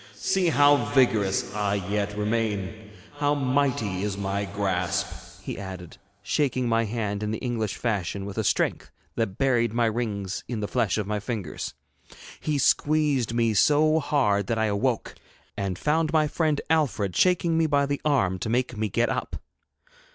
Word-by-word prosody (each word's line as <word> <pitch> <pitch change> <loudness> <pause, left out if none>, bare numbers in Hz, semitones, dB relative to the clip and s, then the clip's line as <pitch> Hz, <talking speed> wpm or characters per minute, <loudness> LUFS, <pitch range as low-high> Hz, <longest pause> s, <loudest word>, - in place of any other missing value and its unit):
'See 190 -2 +1
how 145 -2 +5 0.2
vigorous 110 -7 +2
I 105 -1 0
yet 100 +1 -2
remain, 105 -2 -1
and 110 -1 -14 0.3
how 145 0 +2
mighty 130 -8 0
is 100 -1 -2
my 100 0 -2
grasp,' 95 -3 -3
he - - -5
added, 95 -3 -8 0.3
shaking 130 0 0
my 115 0 +2
hand 105 -2 -3
in 105 - -2
the 110 - -2
English 115 -5 -2
fashion 100 -4 -2
with 100 -1 -6
a - - 0
strength - - 0 0.2
that 110 -4 -2
buried 120 -4 +2
my 120 0 +2
rings 105 -4 -2
in 120 -3 -3
the 105 - -2
flesh 115 -6 0
of 105 - -1
my 105 +1 -2
fingers. 105 -6 -5 0.6
He 150 -2 -1
squeezed 145 -4 +2
me 115 -2 +2
so 155 +8 +4
hard 105 -11 +1
that 115 - 0
I 110 - +2
awoke, 110 +3 -1 0.4
and 100 -3 -3
found 155 - +1
my 155 -2 +3
friend 155 -1 0
Alfred 125 - +1
shaking 175 -2 +3
me 165 0 +3
by 140 -1 +2
the 145 0 -2
arm 100 -12 +1
to 110 - -3
make 125 +1 0
me 110 0 -1
get 120 +5 +1
up. - - -3
115 Hz, 170 wpm, -26 LUFS, 100-140 Hz, 0.6 s, how